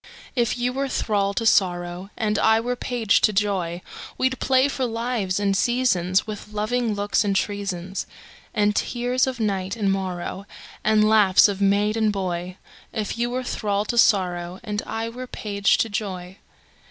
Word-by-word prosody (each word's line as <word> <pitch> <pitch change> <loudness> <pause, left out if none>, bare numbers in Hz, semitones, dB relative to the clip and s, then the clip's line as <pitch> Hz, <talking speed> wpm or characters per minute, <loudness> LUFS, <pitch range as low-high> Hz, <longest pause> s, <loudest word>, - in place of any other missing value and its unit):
If 240 -2 +1
you 245 +1 -1
were 275 +1 -2
thrall 200 -5 0
to 230 - -1
sorrow, 175 -2 +1
And 210 -1 0
I 220 0 +4
were 245 +2 -2
page 240 -4 +1
to 215 - +4
joy, 190 -4 -1 0.3
We'd 260 0 0
play 260 0 +3
for 270 -2 -2
lives 230 -5 -1
and 200 -1 +1
seasonsWith 210 -3 0
loving 215 +1 -1
looks 205 +1 +1
and 200 -1 0
treasonsAnd 200 +2 -3
tears 245 +4 0
of 255 -2 -3
night 195 -3 -1
and 205 -4 +1
morrowAnd 190 +1 -4 0.6
laughs 215 -3 +6
of 200 -1 -4
maid 205 +2 +2
and 220 -1 +2
boy; 180 -2 -3 0.3
If 220 0 -3
you 240 0 +1
were 255 +1 -2
thrall 205 -4 -1
to 235 - -3
sorrow, 180 -4 +2
And 210 -2 -3
I 225 +1 -3
were 250 +2 -7
page 200 -4 +1
to - - +1
joy. 190 -3 -5
210 Hz, 155 wpm, -23 LUFS, 195-235 Hz, 0.6 s, laughs